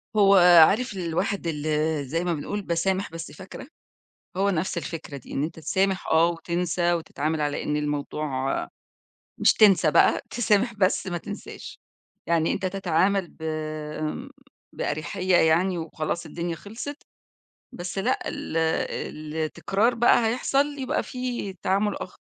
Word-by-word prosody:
هو 200 -1 +6 0.3
عارف 240 +3 0
الواحد 175 +2 -2
اللى 155 -1 0
زي 165 +6 -2
ما 175 -1 0
بنقول 165 +7 -3
باسامح 190 +2 -1
بس 165 0 -7
فاكرة؟ 190 +6 -10 0.7
هو 200 +1 +2
نفس 175 -1 -1
الفكرة 165 -3 -6
دي، 135 - -11
إن 140 - -1
أنت 165 +2 -4
تسامح 190 +4 0
آه، 160 +1 +5
وتنسى، 175 0 -1
وتتعامل 160 -2 -2
على 145 -1 -1
إن 150 - -1
الموضوع 150 +1 -2 1.1
مش - - +5
تنسى 205 -4 +5
بقى - - +4
تسامح 230 0 +1
بس 195 -2 +1
ما 175 -2 -2
تنساش، - - -9 0.5
يعني 165 -1 +2
أنت 190 - -2
تتعامل 190 0 +1
ب - - -18 0.6
آمم، 155 - -4 0.4
بأريحية 180 +4 -1
يعني 175 +3 +3
وخلاص 160 +1 -4
الدنيا 170 -1 -4
خلصت، 225 - -8 0.7
بس 180 -4 -5
لأ 195 - 0
ال - - -5 0.8
التكرار 195 +9 0
بقى 235 0 +4
هيحصل 275 +5 0
يبقى 260 -2 -1
فيه 250 -6 -4
تعامل 200 +2 +1
آخر. - - -8
175 Hz, 135 wpm, -25 LUFS, 160-200 Hz, 1.1 s, هو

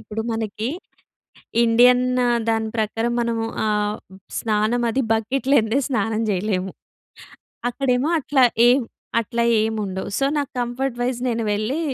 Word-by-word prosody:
ఇప్పుడు 220 +1 -6
మనకీ, 220 0 -3 1.0
ఇండియన్ 245 +2 +5 0.4
దాని 225 -1 +1
ప్రకారం 225 +2 -1
మనము 230 -1 -1 0.2
ఆహ్, 210 0 0 0.4
స్నానం 220 +2 0
అది 265 +4 0
బక్కిట్ 250 +5 -1
లేన్దే 230 -2 +3
స్నానం 225 -3 0
జెయలేము. 190 -1 -1 1.0
అక్కడేమో 255 +2 0
అట్లా 270 -2 +3 0.2
ఏం 255 +3 +5 0.4
అట్లా 235 +1 -1 0.2
ఏముండవు. 210 -4 -3
సో, 275 - +1
నాకు 285 -2 -2
కంఫర్ట్ 245 +1 -2
వైజ్ 245 0 -1
నేను 230 -1 -1
వెళ్ళీ, 215 +9 -1
230 Hz, 120 wpm, -22 LUFS, 215-250 Hz, 1.0 s, ఇండియన్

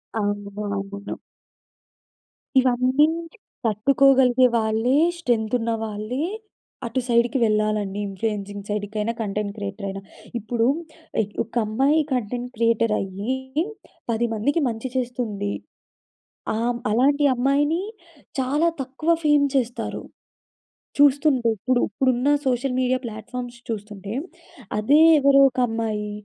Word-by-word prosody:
అవును. 205 -1 -2 0.3
అవును. 200 +1 -6 1.4
ఇవన్నీ 255 +3 +3 0.6
తట్టుకోగలిగే 255 +3 +4
వాళ్ళే 225 +4 +1 0.2
స్ట్రెం‌త్ 230 -7 0
ఉన్నవాళ్ళే 225 +4 -2 0.6
అటు 235 +3 -1
సైడ్‌కి 235 +3 +2
వెళ్ళాలండి. 215 -2 0
ఇన్‌ఫ్లుయన్‌సింగ్ 205 0 -4
సైడ్ 205 0 -1
కైనా 215 +2 -1
కంటెంట్ 205 -1 -2
క్రియేటరయినా. 195 -1 -5 0.4
ఇప్పుడు 230 +1 -1 0.8
ఒక 230 - -18
అమ్మాయి 270 +8 +2
కంటెంట్ 245 +1 -2
క్రియేటరయ్యి 225 -1 0 0.8
10 230 +1 +1
మందికి 280 +9 0
మంచి 225 +3 -5
చేస్తుంది. 235 -5 -2 1.0
ఆహ్, 225 - -1
హ్మ్. 240 - -4
అలాంటి 280 +6 +3
అమ్మాయిని 290 +7 +2 0.6
చాలా 285 +6 +2
తక్కువ 270 +5 -4
ఫేమ్ 295 -1 +4
చేస్తారు. 245 -2 -1 1.0
చూస్తుంటే 285 -3 +4
ఇప్పుడు, 245 +4 +1
ఇప్పుడున్న 255 +4 +1 0.2
సోషల్ 250 +1 0
మీడియా 255 0 +2
ప్లాట్‌ఫార్మ్స్ 240 +3 -7
చూస్తుంటే. 205 -2 -6 0.7
అదే 280 +9 +4 0.2
ఎవరో 275 -1 +5
ఒక 250 - -13
అమ్మాయి 220 -2 -2
235 Hz, 100 wpm, -23 LUFS, 210-260 Hz, 1.4 s, ఎవరో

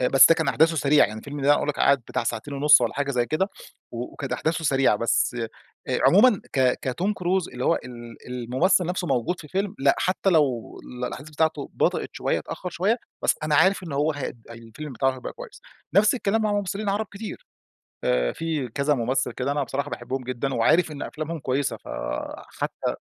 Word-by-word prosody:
آآ 125 - +2
بس 135 -1 +8
ده 165 - +6
كان 160 -1 -1
أحداثه 165 +1 +3
سريعة 145 0 +4
يعني 110 +1 -7
الفيلم 145 0 -7
ده 140 - +1
أنا 145 - +7
أقول - - -2
لك 150 - -1
قعد 140 0 +5
بتاع - - -2
ساعتين 145 - -3
ونص 145 0 +6
والّا 120 - -1
حاجة 140 0 -1
زي 120 -3 +1
كده 170 +8 0 0.4
وكانت 125 +3 -5
أحداثه 160 0 -1
سريعة، 135 -6 +3
بس 115 +2 +1 0.5
آآ - - +1
عمومًا 210 +2 +6
ك 130 -2 +2
كتوم 175 +11 -1
كروز 185 -1 -1
اللي 125 +1 -5
هو - - +4
ال 120 -2 -10
الممثّل 130 - +1
نفسه 180 0 -2
موجود 130 +8 0
في 150 - -12
فيلم 195 +4 -2
لأ، 140 +1 +4
حتّى 190 +1 +1
لو 140 -8 +1 0.3
الأحداث 150 +4 -8
بتاعته 155 -1 -1
بطئت - - 0
شويّة - - -1
اتأخر 180 - -6
شويّة 200 +8 +1 0.3
بس - - +4
أنا 155 -1 0
عارف 190 +6 +4
إن 160 - -7
هو 150 +3 +1
هي 145 -3 -5 0.2
الفيلم 115 +5 -9
بتاعه 135 +1 +1
هيبقى 130 - -7
كويّس. - - -11 0.3
نفس 205 +5 +5
الكلام 220 -2 0
مع 210 -1 +1
ممثّلين 205 +1 -2
عرب 205 +2 0
كتير. 210 +2 -8 0.6
آآ، 60 -1 +1
في 160 -6 -2
كذا 140 +5 +1
ممثّل 125 +1 0
كده 130 +4 -2
أنا 145 0 0
بصراحة 140 +2 -3
باحبهم 130 +2 -4
جدًا 130 +2 -3
وعارف 155 +9 +3
إن 145 - -7
أفلامهم 155 +1 -5
كويّسة 135 +1 -1
فحتّى 65 -1 -5
145 Hz, 195 wpm, -24 LUFS, 130-175 Hz, 0.6 s, بس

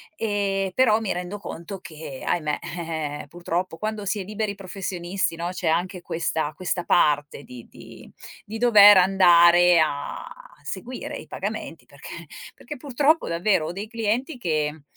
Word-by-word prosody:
Ehm, 200 -5 -1
però 225 -3 +3
mi 215 - -2
rendo 180 +3 -4
conto 195 -1 -8
che, 155 -6 -9
ahimè, 155 -4 -1
eh-eh, 160 -3 -5
purtroppo 175 +2 -4
quando 215 +2 -4
si 200 +1 -1
è - - -5
liberi 210 +1 -3
professionisti, 190 -2 -3
no, 170 +1 -3
c'è 180 -2 -4
anche 175 +3 0
questa 160 -2 -2
questa 175 +1 -3
parte 145 -3 +2
di 125 -4 -12
di - - -14 0.4
di 220 +2 -6
dover 210 -3 +8
andare 175 -2 +6
a 145 -2 -2 0.4
seguire 250 +1 -6
i - - -11
pagamenti - - -6
perché - - -11 0.3
perché 295 - -9
purtroppo 285 +4 +1
davvero 170 0 +1
ho - - -3
dei 200 +4 -6
clienti 230 +6 -2
che, 155 -7 -2
180 Hz, 150 wpm, -24 LUFS, 165-205 Hz, 0.4 s, dover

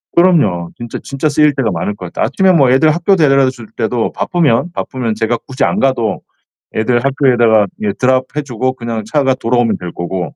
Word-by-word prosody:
그럼요. 125 - +3
진짜, 120 -1 -6
진짜 140 +3 -2
쓰일 150 0 +3
때가 125 -6 0
많을 90 +4 -3
것 90 - -9
같아. - - -2
아침에 190 -1 +2
뭐 140 -7 +4
애들 150 +5 +4
학교 175 +4 +2
데려다 135 -5 +3
줄 120 -4 -10
때도 115 0 -1
바쁘면, 170 -2 0
바쁘면 120 -9 -3
제가 115 +1 -1
굳이 135 +1 -2
안 - - +1
가도 120 -5 0 0.5
애들 120 +2 +1
학교에다가 120 -6 +3 0.2
예 105 -2 0
드롭해 130 +4 0
주고 130 -1 -2
그냥 115 -3 -5
차가 135 -3 +2
돌아오면 120 -1 0
될 90 -1 -7
거고 85 -2 -5
130 Hz, 390 characters per minute, -15 LUFS, 110-140 Hz, 0.5 s, 뭐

